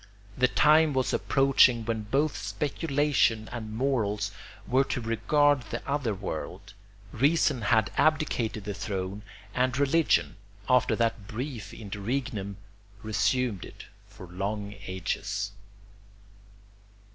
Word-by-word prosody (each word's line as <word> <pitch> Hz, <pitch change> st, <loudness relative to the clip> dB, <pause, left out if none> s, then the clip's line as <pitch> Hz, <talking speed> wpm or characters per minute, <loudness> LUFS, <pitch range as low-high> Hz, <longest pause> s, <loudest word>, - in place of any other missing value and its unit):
The 125 Hz, -, +3 dB
time 150 Hz, +3 st, +4 dB
was 130 Hz, -1 st, 0 dB
approaching 135 Hz, -4 st, +4 dB
when 115 Hz, -1 st, -1 dB
both 140 Hz, +7 st, +1 dB
speculation 135 Hz, +1 st, 0 dB
and 115 Hz, -3 st, -6 dB
morals 105 Hz, -6 st, 0 dB, 0.3 s
were 130 Hz, +2 st, +3 dB
to -, -, -2 dB
regard 145 Hz, +5 st, +2 dB
the 120 Hz, -, -5 dB
other 140 Hz, -7 st, -1 dB
world; 95 Hz, +1 st, -6 dB, 0.4 s
reason 140 Hz, 0 st, +2 dB
had 110 Hz, +1 st, +2 dB
abdicated 145 Hz, -, +1 dB
the 105 Hz, +1 st, -4 dB
throne, 100 Hz, -1 st, -4 dB, 0.3 s
and 130 Hz, +1 st, +1 dB
religion, 140 Hz, -, +2 dB, 0.3 s
after 125 Hz, -2 st, +3 dB
that 115 Hz, -3 st, -1 dB
brief 115 Hz, -3 st, -5 dB
interregnum, 105 Hz, -1 st, -4 dB, 0.5 s
resumed 110 Hz, 0 st, 0 dB
it -, -, -11 dB, 0.2 s
for 95 Hz, -, -12 dB
long 100 Hz, +3 st, -4 dB
ages. 100 Hz, +2 st, -3 dB
115 Hz, 110 wpm, -28 LUFS, 105-135 Hz, 0.5 s, time